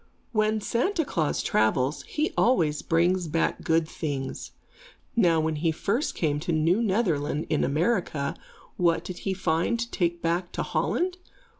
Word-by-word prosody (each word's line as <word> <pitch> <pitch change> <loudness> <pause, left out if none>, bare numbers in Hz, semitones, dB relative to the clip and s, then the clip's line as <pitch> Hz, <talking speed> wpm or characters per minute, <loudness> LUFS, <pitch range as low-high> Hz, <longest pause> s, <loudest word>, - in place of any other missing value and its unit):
When 215 -1 +1
Santa 325 - 0
Klaas 155 - -1
travels, 125 +7 +1
he 305 +1 -1
always 165 -12 +2
brings 175 +2 +2
back 160 +2 0
good 165 0 +2
things. 140 -5 -4 0.7
Now 175 -8 +4
when 160 -1 0
he 165 +2 +1
first 205 - -1
came 145 -3 0
to 170 - -3
New 165 +6 +2
Netherland 175 -9 0
in 155 - +2
America, 155 -2 0 0.4
what 170 -2 +2
did 185 - -7
he 195 -1 -2
find 175 +5 0
to 235 0 -3
take 170 -2 0
back 170 +1 -1
to - - -2
Holland? 365 +1 -1
170 Hz, 150 wpm, -26 LUFS, 155-215 Hz, 0.7 s, Now